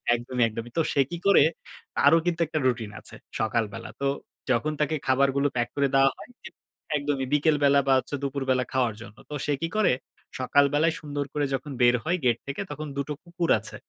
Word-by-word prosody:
একদমই, 120 Hz, +1 st, -1 dB
একদমই। 115 Hz, +1 st, -6 dB
তো 165 Hz, -, +4 dB
সে 140 Hz, -, +4 dB
কি 175 Hz, -, -4 dB
করে? 200 Hz, -, +7 dB, 0.5 s
তারও 165 Hz, -, +6 dB
কিন্তু 170 Hz, -1 st, 0 dB
একটা 155 Hz, 0 st, -2 dB
রুটিন 115 Hz, -4 st, -1 dB
আছে -, -, -13 dB, 0.2 s
সকালবেলা। 110 Hz, -2 st, -1 dB
তো -, -, 0 dB, 0.5 s
যখন 140 Hz, +5 st, +1 dB
তাকে 155 Hz, +1 st, +1 dB
খাবারগুলো 140 Hz, +1 st, +3 dB
প্যাক 120 Hz, -1 st, +1 dB
করে 140 Hz, -1 st, +2 dB
দেওয়া 135 Hz, 0 st, +6 dB
হয় -, -, -12 dB, 0.7 s
একদমই। 145 Hz, -2 st, -1 dB
বিকেলবেলা 145 Hz, -2 st, +4 dB
বা 135 Hz, -, +5 dB
হচ্ছে 145 Hz, -, -5 dB
দুপুরবেলা 135 Hz, -2 st, 0 dB
খাওয়ার 125 Hz, -4 st, +1 dB
জন্য। 110 Hz, 0 st, -12 dB
তো -, -, -7 dB
সে 145 Hz, -, +1 dB
কি 165 Hz, -, 0 dB
করে? 215 Hz, -9 st, +4 dB, 0.5 s
সকালবেলায় 145 Hz, +5 st, +3 dB
সুন্দর 145 Hz, -2 st, -3 dB
করে 145 Hz, -1 st, 0 dB
যখন 135 Hz, +2 st, -3 dB
বের 120 Hz, 0 st, +6 dB
হয় 175 Hz, +6 st, 0 dB
গেট 120 Hz, -2 st, +3 dB
থেকে, 135 Hz, -, -4 dB
তখন 150 Hz, +1 st, -5 dB
দুটো 140 Hz, +1 st, -2 dB
কুকুর 175 Hz, -1 st, -3 dB
আছে। 110 Hz, -, -10 dB
140 Hz, 185 wpm, -26 LUFS, 125-150 Hz, 0.7 s, করে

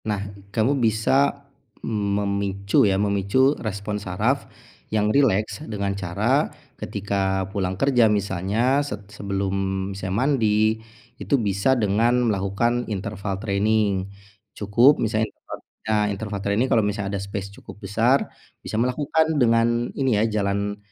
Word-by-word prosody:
Nah, 105 Hz, -2 st, -1 dB, 0.3 s
kamu 120 Hz, +7 st, +1 dB
bisa 135 Hz, +6 st, +2 dB, 0.4 s
memicu 100 Hz, -2 st, 0 dB
ya, 95 Hz, -, +1 dB
memicu 100 Hz, +7 st, +2 dB
respon 105 Hz, -1 st, -4 dB
saraf 90 Hz, -2 st, -1 dB, 0.4 s
yang 105 Hz, 0 st, +1 dB
rileks 110 Hz, -6 st, +2 dB
dengan 100 Hz, -2 st, -2 dB
cara 95 Hz, -3 st, 0 dB, 0.3 s
ketika 95 Hz, -1 st, -1 dB
pulang 95 Hz, -2 st, -2 dB
kerja 125 Hz, -2 st, +4 dB
misalnya 105 Hz, +6 st, +1 dB
se 145 Hz, -, -4 dB, 0.2 s
sebelum 100 Hz, -1 st, -2 dB, 0.4 s
misalnya 95 Hz, 0 st, -4 dB
mandi, 110 Hz, -4 st, +2 dB, 0.4 s
itu 140 Hz, -, +1 dB
bisa 105 Hz, +3 st, +1 dB
dengan 115 Hz, +3 st, +2 dB, 0.2 s
melakukan 115 Hz, +6 st, -1 dB
interval 100 Hz, -1 st, -4 dB
training, 100 Hz, -2 st, +1 dB, 0.5 s
cukup 115 Hz, +8 st, +4 dB
misalnya 110 Hz, 0 st, 0 dB
interva -, -, -10 dB, 0.3 s
nah 105 Hz, -1 st, +1 dB
interval 100 Hz, 0 st, -5 dB
training, 100 Hz, +5 st, +2 dB
kalau 115 Hz, -, +4 dB
misalnya 100 Hz, -1 st, -2 dB
ada -, -, -5 dB
space 100 Hz, 0 st, -5 dB
cukup -, -, -12 dB
besar, 115 Hz, +7 st, +2 dB, 0.4 s
bisa -, -, -5 dB
melakukan 150 Hz, +5 st, +1 dB
dengan 115 Hz, 0 st, +2 dB
ini 135 Hz, -3 st, +1 dB
ya 105 Hz, -, +2 dB, 0.2 s
jalan 100 Hz, +1 st, -1 dB
105 Hz, 125 wpm, -23 LUFS, 100-115 Hz, 0.5 s, kerja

